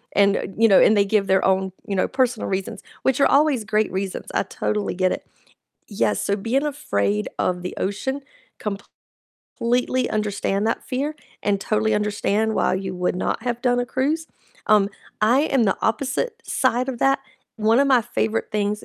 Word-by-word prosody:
and, 200 0 +4
uh - - -3
you 225 +1 +5
know, 195 - +6
and 215 - +5
they 200 - +4
give 200 0 +2
their 190 0 +3
own, 190 0 +1 0.2
you 200 - -2
know, 185 - +2
personal 250 -4 0
reasons, 190 0 -3 0.2
which 265 0 +2
are - - +6
always 280 -5 +3
great 215 +1 0
reasons, 190 0 -3
I - - +1
totally 205 +2 -2
get 185 0 +1
it. - - -7 0.6
Yes, 205 - 0
so 200 - +1
being 235 +8 0
afraid 105 - -1
of 180 -1 0
the 180 - -5
ocean, 265 +8 -2 1.2
completely 250 +2 -1
understand 205 -1 -1
that 230 - -2
fear, 280 +4 -2 0.3
and 200 -1 +1
totally 215 +1 0
understand 210 +1 0
why - - +2
you 190 0 -3
would 180 0 -1
not - - -2
have 240 -1 -2
done 245 -1 +2
a 245 - -2
cruise, 295 +6 -1 0.4
um, 210 -2 +5 0.3
I 235 +5 +4
am 270 -6 +2
the 195 - +1
opposite 280 - -1
side 255 0 0
of 255 -3 -3
that. 270 +2 +3 0.4
One 220 +2 +3
of 280 - +3
my 255 -3 +5
favorite 225 -1 -2
things 210 0 -1
215 Hz, 180 wpm, -22 LUFS, 195-255 Hz, 1.2 s, know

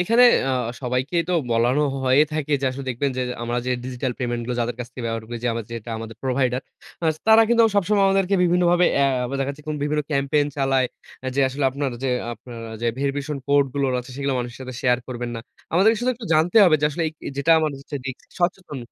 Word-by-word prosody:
এখানে 230 +7 +5 0.2
আ - - +1 0.3
সবাইকেই 130 +7 0
তো - - 0 0.2
বলানো 120 +5 +2 0.2
হয়ে 130 +3 +5
থাকে 155 -1 -2
যে, - - -2
আসলে 135 +1 -6
দেখবেন 135 +3 -1
যে, - - +1 0.2
আমরা 120 +1 -1
যে, 125 - 0
ডিজিটাল 125 0 -3
পেমেন্ট 120 -2 -2
গুলো 125 - -2
যাদের 120 0 -2
কাছ 120 - -4
থেকে 125 - -7
ব্যবহার 115 -1 -3
করি 120 - -5
যে, 120 - +2
আমার 115 -1 -4
যেটা 115 0 -6
আমাদের 115 -1 -8
প্রোভাইডার। 130 -1 0 0.4
আস 155 -1 +2
তারা 220 0 +8
কিন্তু 235 -1 +4
আবার 225 - +2
সবসময় 200 +1 +3
আমাদেরকে 195 0 +2
বিভিন্নভাবে 175 0 +3
অ্যা 140 0 +4 0.2
আবার 130 +3 -4
দেখা 135 - -1
যাচ্ছে 145 +1 -11
কোন 150 - -2
বিভিন্ন 150 +1 0
ক্যাম্পেইন 145 +1 +1
চালায়। 135 -2 +2 0.4
আ - - -3
যে, 140 - +2
আসলে 135 +2 -3
আপনার 140 0 -2
যে, 135 - 0 0.2
আপনার 115 -2 -9
যে, - - +1
verification 140 +1 -2
কোড 140 0 +5
গুলোর 135 -2 +1
আছে 125 - -12
সেগুলা 140 -1 -1
মানুষের 120 0 -5
সাথে 130 -1 -7
শেয়ার 125 -1 +3
করবেন 120 -1 -4
না। 115 - -5 0.3
আমাদেরকে 205 +6 +4
শুধু 250 +1 +1
একটু 225 -3 -9
জানতে 165 +7 +2
হবে 170 -4 +5
যে, 150 - +1
আসলে 165 +4 -3
এইক 155 - -13 0.2
যেটা 140 +4 +1
আমার 155 -1 +1
হচ্ছে 145 +1 -6
রিস্ক 130 - -6 0.2
সচেতন। 175 -4 -1
140 Hz, 225 wpm, -23 LUFS, 125-160 Hz, 0.4 s, তারা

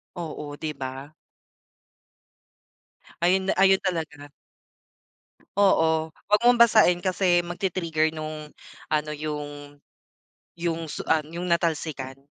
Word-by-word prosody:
Oo, 155 -4 -6
di 155 +1 -4
ba? 135 +2 -7 2.1
Ayun 190 +2 +2
ayun 190 0 +5
talaga. 160 -6 -4 1.3
Oo, 160 -5 +3 0.2
wag 210 0 +5
mong 245 -1 +6
basain 215 -7 +5
kasi 180 -2 +2
magti-trigger 170 -3 -1
nung 155 -1 -7 0.4
ano, 150 0 0
yung 145 -1 -6 0.8
yung 165 -2 -2
su - - -6
ah, 160 -1 +3
yung 170 +4 -6
natalsikan. 155 -6 -1
160 Hz, 95 wpm, -25 LUFS, 150-180 Hz, 2.1 s, mong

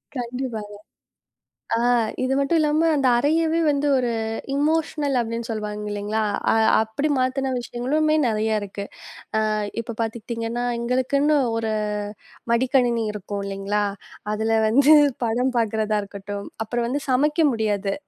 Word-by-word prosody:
கண்டிப்பாங்க. 240 -4 -4 1.0
ஆ. - - 0 0.4
இது 255 +1 0
மட்டும் 280 +4 +2
இல்லாம 310 +2 +2
அந்த 275 -3 +1
அறையவே 320 +4 +2
வந்து 290 0 +1
ஒரு 245 -2 0 0.4
எமோஷனல் 300 -1 0
அப்படின்னு 230 0 -4
சொல்லுவாங்க 210 -1 -4
இல்லீங்களா? 205 +2 -2 0.3
அ - - +3 0.3
அப்படி 220 +7 -2
மாத்துன 260 +1 0
விஷயங்களுமே 285 +6 0
நிறைய 220 -1 +1
இருக்கு. 200 0 -6 0.7
அ - - 0 0.3
இப்ப 230 0 -7
பாத்துக்கிட்டீங்கன்னா, 230 +1 -3 0.2
எங்களுக்குன்னு 260 +5 +1 0.2
ஒரு 225 -1 -1 0.8
மடிக்கணினி 240 -1 +2
இருக்கும் 205 0 -5
இல்லைங்களா? 200 +1 -1 0.5
அதுல 220 +1 +1
வந்து 275 +7 +5 0.3
படம் 250 +3 0
பார்க்கிறதா 220 -2 +1
இருக்கட்டும். 200 0 -7 0.2
அப்புறம் 235 +1 -2
வந்து 280 +4 -2
சமைக்க 290 +4 +2 0.2
முடியாது. 205 -3 -1
235 Hz, 120 wpm, -23 LUFS, 215-275 Hz, 1.0 s, வந்து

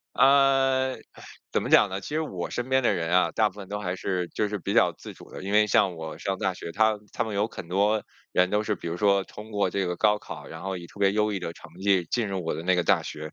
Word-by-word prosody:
呃， 135 -1 +4 0.6
怎 - - +1
么 - - -4
讲 - - +6
呢？ 95 +1 -4
其 - - -7
实 155 +2 -1
我 95 - -4
身 120 +1 -3
边 130 0 +3
的 120 - +3
人 85 -1 -2
啊， 90 -1 +3
大 110 +4 +3
部 95 - -17
分 100 -2 -9
都 105 - -3
还 90 -2 -3
是 90 -2 -2
就 105 - -1
是 105 0 -3
比 - - -3
较 - - +4
自 - - -11
主 - - -15
的。 - - -8
因 100 +2 -4
为 105 0 +5
像 100 -4 +2
我 80 -1 -7
上 95 -1 -2
大 95 - 0
学， 90 - -8
他 110 +3 +2 0.2
他 - - 0
们 110 -2 -5
有 105 +2 +1
很多 100 +3 0 0.3
人 90 0 +3
都 105 +1 +1
是， 110 - -1
比 - - -9
如 85 +1 -4
说 100 -1 +3
通 105 +3 -11
过 100 -3 0
这 95 0 -1
个 90 0 -2
高 105 +1 +3
考， - - -9
然 - - -9
后 95 0 -3
以 85 -1 -8
特 100 - -15
别 100 0 +4
优 105 0 +1
异 100 - -1
的 85 -2 -5
成 - - -14
绩 95 -2 +3
进 115 -4 0
入 95 -3 -3
我 80 - -1
的 80 - -5
那 95 +1 +2
个 90 - +2
大 - - +3
学。 75 0 -7
100 Hz, 310 characters per minute, -26 LUFS, 90-110 Hz, 0.6 s, 讲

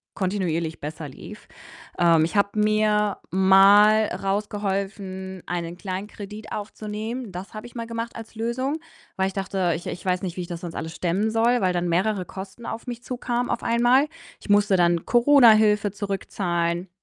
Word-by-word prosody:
kontinuierlich 175 -4 -2
besser 150 +1 -6
lief. 130 - -11 0.5
Ähm, 165 -2 +5
ich 175 - -5
habe 200 +1 +1
mir 210 -1 +2
mal 200 +4 +6
rausgeholfen, 195 -2 -3
einen 175 0 -4
Kleinkredit 205 +2 -7
aufzunehmen. 215 +2 -5
Das 185 +4 -8
habe 215 +3 -7
ich 240 - -18
mal 230 -1 -4
gemacht 230 0 -5
als 225 -1 -9
Lösung, 255 +6 -2 0.4
weil 190 0 +2
ich 190 - -5
dachte: 190 -3 -1
„Ich 170 - -7
ich 175 - -6
weiß 185 0 0
nicht, 175 -2 -4
wie - - -2
ich 175 - -6
das 170 -1 -6
sonst 170 -2 -6
alles 160 +1 -5
stemmen 190 +5 0
soll“, 235 +2 +2
weil 185 -1 +2
dann 175 0 -1
mehrere 185 +2 +1
Kosten 195 +5 -9
auf 230 +3 -6
mich 240 0 -6
zukamen 245 -1 -2
auf 235 - -1
einmal. 245 +5 +3 0.3
Ich - - -14
musste 205 -1 +4
dann 170 -1 +2
Corona-Hilfe 220 -6 +5
zurückzahlen. 180 -3 -2
200 Hz, 165 wpm, -24 LUFS, 180-220 Hz, 0.5 s, mal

